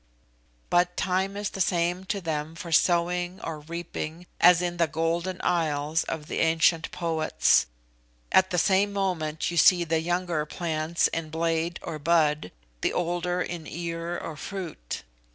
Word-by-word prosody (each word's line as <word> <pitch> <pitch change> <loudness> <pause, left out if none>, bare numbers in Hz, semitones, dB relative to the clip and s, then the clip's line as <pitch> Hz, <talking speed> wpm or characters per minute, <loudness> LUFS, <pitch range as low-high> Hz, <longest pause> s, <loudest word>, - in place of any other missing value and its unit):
But 175 0 +2
time 190 +2 0
is 205 -1 -3
the 195 - -4
same 175 +1 +1
to 200 +1 -2
them 160 -1 -3
for 170 0 -7
sowing 175 +2 +2
or 160 -2 -4
reaping 170 +1 -6
as 175 -1 +7
in 175 -1 -2
the 170 -1 +3
Golden 165 +3 -1
Isles 160 -2 0
of 160 -2 -4
the - - -3
ancient 165 0 +3
poets. 160 - +2 0.6
At 190 0 +5
the 180 - -1
same 195 +3 +3
moment 170 -6 -1
you 170 - -4
see 175 +2 +6
the 165 -1 0
younger 175 -2 -1
plants 160 0 0
in 165 -1 -4
blade 165 +1 -1
or 160 -3 -5
bud, 150 - +2 0.3
the - - +1
older 175 +1 -1
in 170 -3 -6
ear 170 +1 -4
or 160 - -6
fruit. 170 - -6
170 Hz, 150 wpm, -27 LUFS, 160-180 Hz, 0.6 s, as